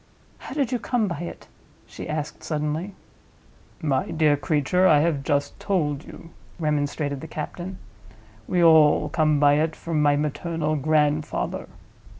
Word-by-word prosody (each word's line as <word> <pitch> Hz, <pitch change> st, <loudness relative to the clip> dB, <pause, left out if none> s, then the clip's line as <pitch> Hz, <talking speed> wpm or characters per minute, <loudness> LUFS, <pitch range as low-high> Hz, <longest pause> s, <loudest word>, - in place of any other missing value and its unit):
"How 265 Hz, -, -8 dB
did 275 Hz, -4 st, 0 dB
you 250 Hz, -, 0 dB
come 220 Hz, +1 st, 0 dB
by 170 Hz, -6 st, -4 dB
it?" 175 Hz, -, -7 dB, 0.4 s
she -, -, -9 dB
asked, 155 Hz, -1 st, -4 dB
suddenly. 155 Hz, +5 st, -3 dB, 0.9 s
"My 135 Hz, -4 st, 0 dB
dear 155 Hz, -2 st, +3 dB
creature, 150 Hz, +6 st, +2 dB
I 155 Hz, -, +6 dB
have 155 Hz, -3 st, +1 dB
just 145 Hz, 0 st, -1 dB
told 150 Hz, -7 st, -1 dB
you," 165 Hz, -, -12 dB, 0.3 s
remonstrated 145 Hz, -3 st, -1 dB
the 160 Hz, -, -7 dB
captain. 175 Hz, +5 st, -6 dB, 0.7 s
"We 180 Hz, -1 st, +2 dB
all 160 Hz, -3 st, +5 dB
come 155 Hz, -3 st, +2 dB
by 145 Hz, 0 st, +5 dB
it 155 Hz, 0 st, 0 dB
from 165 Hz, -3 st, -2 dB
my 145 Hz, -1 st, +4 dB
maternal 155 Hz, +1 st, -1 dB
grandfather." 150 Hz, 0 st, 0 dB
155 Hz, 145 wpm, -24 LUFS, 145-170 Hz, 0.9 s, I